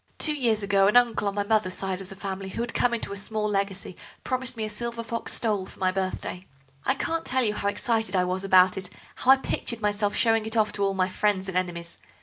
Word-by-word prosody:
Two 305 - +2
years 230 -6 +1
ago 195 -1 +3
an 210 - +5
uncle 235 -4 +3
on 200 - -2
my 205 - 0
mother's 205 -3 +1
side 190 -1 -3
of 190 - -9
the 195 - -9
family, 195 0 -5
who 230 - -4
had 235 -1 -4
come 245 - +2
into 230 -4 -2
a - - -5
small 210 +1 -2
legacy, 195 -2 -2 0.3
promised 255 -1 -2
me 220 - -1
a - - -3
silver 235 +2 -2
fox 230 0 -4
stole 205 -5 0
for - - -15
my 185 -1 +1
birthday. 185 -1 -4 0.4
I 265 - +1
can't 330 +4 -2
tell 260 0 +1
you 210 -2 +1
how 200 - -2
excited 220 0 0
I 180 - +3
was 185 +1 -2
about 185 -1 +5
it, 185 -1 -7 0.3
how 255 - -1
I 270 - +9
pictured 235 -3 -3
myself 205 -1 0
showing 225 -1 +2
it 220 +1 -1
off 215 -1 +3
to 200 -1 -2
all 195 0 +1
my 185 -1 +2
friends 190 0 0
and 190 - -5
enemies. 170 -2 -3
205 Hz, 250 wpm, -26 LUFS, 190-230 Hz, 0.4 s, I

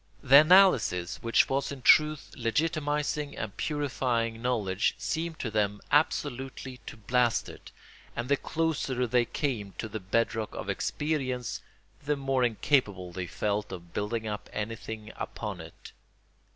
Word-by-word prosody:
The 135 0 +8
analysis 155 - +5
which 115 0 +3
was 135 +1 -1
in 135 -3 -8
truth 150 +2 +5
legitimising 145 +3 -1
and 105 -2 -5
purifying 125 -6 -1
knowledge 110 -5 0
seemed 165 0 -3
to 115 - -3
them 105 -1 0
absolutely 135 -3 0
to - - -8
blast 120 +1 +1
it, - - -11 0.5
and 120 +1 -3
the 140 - +4
closer 140 -5 -1
they 120 0 +2
came 115 -9 -3
to 110 - -3
the 110 0 -5
bed 105 +5 0
rock 110 -1 -4
of - - -3
experience 135 -6 -2 0.4
the 150 +1 +1
more 135 -2 0
incapable 105 -6 +1
they 90 0 -5
felt 105 +3 -2
of 85 -2 -9
building 110 +2 -2
up 105 -1 -5
anything 110 0 -5
upon - - -5
it. - - -12
125 Hz, 140 wpm, -29 LUFS, 105-145 Hz, 0.5 s, The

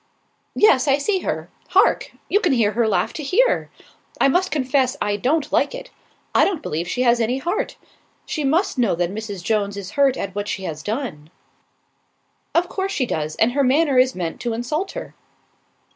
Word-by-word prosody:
"Yes, 280 -10 +4
I 275 0 +4
see 380 +7 0
her. - - -3 0.2
Hark! - - +3 0.2
You 410 - +3
can 430 - +2
hear 225 -5 +3
her 230 +1 +1
laugh 185 -4 0
to - - -5
here. 390 - +2 0.5
I - - +5
must 365 +6 +2
confess 260 -2 +1
I 205 0 0
don't 275 +8 0
like - - +1
it. - - -9 0.4
I - - +5
don't 380 -6 0
believe 165 +3 -3
she 250 - -1
has 240 -1 +4
any 235 +3 0
heart. 345 +9 -2 0.5
She 305 - -3
must 305 +1 +1
know 230 -7 +2
that 175 +2 -1
Mrs. 205 -4 -6
Jones 205 -1 0
is 195 -2 -6
hurt 275 -2 +2
at 195 -1 -4
what 205 +1 -3
she 190 - -3
has 155 -4 -5
done." 205 - -4 1.3
"Of 345 +1 +3
course 385 +2 -3
she 275 -9 0
does, 155 -8 -3
and 225 +2 +2
her 280 +2 +1
manner 275 0 +3
is 255 0 +3
meant 170 -3 -4
to 240 -2 -2
insult 300 +11 -3
her." - - -7
255 Hz, 190 wpm, -21 LUFS, 205-305 Hz, 1.3 s, I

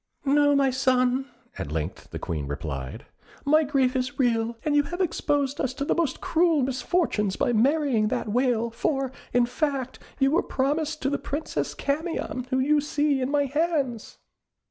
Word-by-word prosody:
"No, 290 +1 +4
my 275 -1 +3
son," 255 0 +2 0.3
at 70 - -4
length 80 +2 -4
the - - -6
Queen 75 -4 -4
replied; 70 -2 -5 0.4
"my 305 +2 +5
grief 270 -3 +1
is 255 +2 -2
real, 230 -3 +1
and 300 -1 +2
you 290 - +6
have 350 +5 -6
exposed 290 -5 0
us 260 -1 -2
to 280 -1 -2
the - - +2
most 325 -6 -1
cruel 325 -4 +2
misfortunes 255 - 0
by 240 - +1
marrying 260 -2 +2
that 220 - -2
Whale, 235 0 +1
for, 270 +3 -1 0.2
in 245 0 +3
fact, 260 0 -2 0.2
you 270 -1 +3
were 330 - +3
promised 300 +3 -1
to 275 - +1
the 285 - -1
Princess 295 +3 -3
Camion 285 -4 -2
whom 260 0 +1
you 295 +2 +3
see 290 -2 0
in 255 - -1
my 285 0 +2
hands." 280 -5 -1
270 Hz, 170 wpm, -26 LUFS, 245-295 Hz, 0.4 s, you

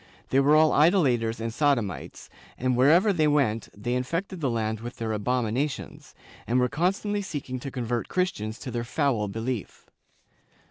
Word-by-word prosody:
They 135 - +4
were 145 +2 +5
all 155 0 +5
idolators 135 - +3
and 115 0 -3
sodomites, 120 - -1 0.3
and 125 0 0
wherever 165 - +5
they 155 -4 +2
went 135 -7 +1
they 120 +4 -2
infected 165 +8 -3
the 140 - +1
land 110 -2 -1
with 120 +2 -7
their 115 -1 -3
abomi 115 +1 -1
nations, 140 +3 -4 0.3
and 125 +2 +2
were 125 0 +2
constantly 195 - 0
seeking 140 -9 -5
to 135 - -6
convert 120 -2 -3
Christians 115 - -2
to 130 - -6
their 120 0 -2
foul 120 -4 0
belief. 115 +1 -5
125 Hz, 165 wpm, -26 LUFS, 115-150 Hz, 0.3 s, were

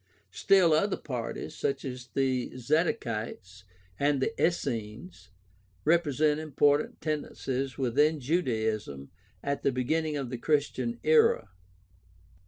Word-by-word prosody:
Still 170 - +4
other 195 +6 +2
parties, 125 -5 -5
such 140 0 -2
as 125 -2 -6
the 130 -2 +1
Zadokites 115 - -2 0.3
and 140 -1 +2
the 225 - 0
Essenes, 125 - -2 0.6
represent 155 -2 +2
important 145 -1 +1
tendencies 135 -3 -3
within 145 +5 +2
Judaism 110 - -1 0.3
at 140 0 -2
the 140 - +2
beginning 150 +5 -1
of 135 -4 -4
the 125 - -4
Chris 150 +1 +2
tian 120 -2 -4
era. 155 -8 +4
135 Hz, 110 wpm, -29 LUFS, 120-155 Hz, 0.6 s, Still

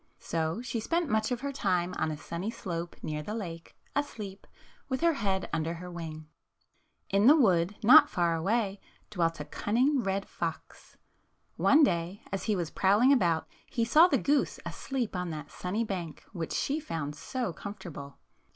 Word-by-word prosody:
So 165 +7 -2
she 235 -2 -3
spent 335 +7 0
much 220 +2 +1
of 245 -1 -1
her 280 0 -2
time 185 -8 0
on 160 - +1
a 155 - -4
sunny 170 +6 -4
slope 175 -6 -5
near 150 0 -3
the 210 +8 -5
lake, 170 -7 -7 0.2
asleep, 210 -9 -4 0.4
with 260 -1 -1
her 335 0 +4
head 195 - -1
under 165 +1 -1
her 180 +1 -8
wing. 160 -2 -7 0.9
In 200 +3 +4
the 295 - +9
wood, 190 - +3
not 235 - +9
far 170 -3 +1
away, 200 +3 0 0.3
dwelt 165 -4 0
a - - -4
cun 205 - -3
ning 265 +2 +4
red 195 -1 -2
fox. - - -6 0.6
One 300 +2 +5
day, 175 -4 0
as 195 -1 -3
he 215 - +1
was 175 -4 -2
prowling 210 +8 +4
about, 170 - +2 0.2
he 230 - 0
saw 310 +9 +7
the 285 - +2
goose 285 +3 +1
asleep 255 -7 -3
on 180 -1 -2
that 150 -2 -6
sunny 195 +6 -2
bank 180 -7 -5
which 165 -4 -4
she 290 +3 0
found 160 - -4
so 240 - -3
comfortable. 170 -8 -8
195 Hz, 175 wpm, -30 LUFS, 170-235 Hz, 0.9 s, the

